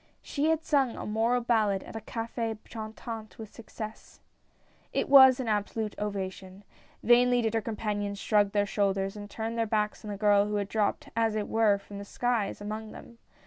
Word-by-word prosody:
She 295 +2 0
had 320 0 +1
sung 275 -6 +1
a - - -6
moral 225 +3 +1
ballad 215 -5 +1
at - - -11
a 225 - -4
Cafe 225 -1 -4
Chantant 220 0 -7
with 220 -2 -10
success! 220 -1 -9 0.7
It - - 0
was 265 -2 +8
an 255 - -3
absolute 210 0 -1
ovation. 195 -1 -5 0.4
Vainly 245 0 +5
did 225 -1 0
her 225 - +1
compan 210 -1 -3
ions 200 0 -4
shrug 205 0 +2
their 205 0 +2
shoulders 195 -1 0
and 205 -1 -8
turn 225 +2 -4
their 230 -1 +1
backs 210 -1 -1
on 215 - -7
the 205 - -4
girl 205 -1 +4
who 210 - -2
had 200 -1 -1
dropped, 210 -1 -1
as 225 -1 +1
it 210 -1 -2
were, 220 -2 +3
from 200 0 -10
the - - -6
skies, 235 -1 -1
among 215 +1 -6
them. 235 - -13
215 Hz, 190 wpm, -29 LUFS, 205-230 Hz, 0.7 s, was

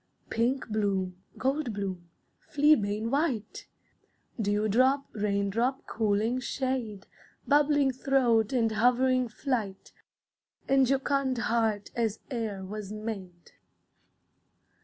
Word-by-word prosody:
Pink 245 +4 0
bloom, 195 -4 -1 0.2
gold 270 -2 -1
bloom, 185 -4 -5 0.4
fleabane 230 -8 +3
white, 270 -7 -1 0.7
Dewdrop, 220 +7 +2
raindrop, 210 +5 0
cooling 220 +3 0
shade, 255 -6 -3 0.4
Bubbling 290 -1 +4
throat 245 -5 +2
and 230 -4 +2
hovering 250 +3 +3
flight, 225 -5 -3 0.7
And 270 -1 +4
jocund 270 0 +1
heart 225 -3 0
as 225 -2 0 0.2
e'er 210 -5 -3
was 205 0 -6
made. 200 -5 -7
230 Hz, 90 wpm, -28 LUFS, 205-260 Hz, 0.7 s, Bubbling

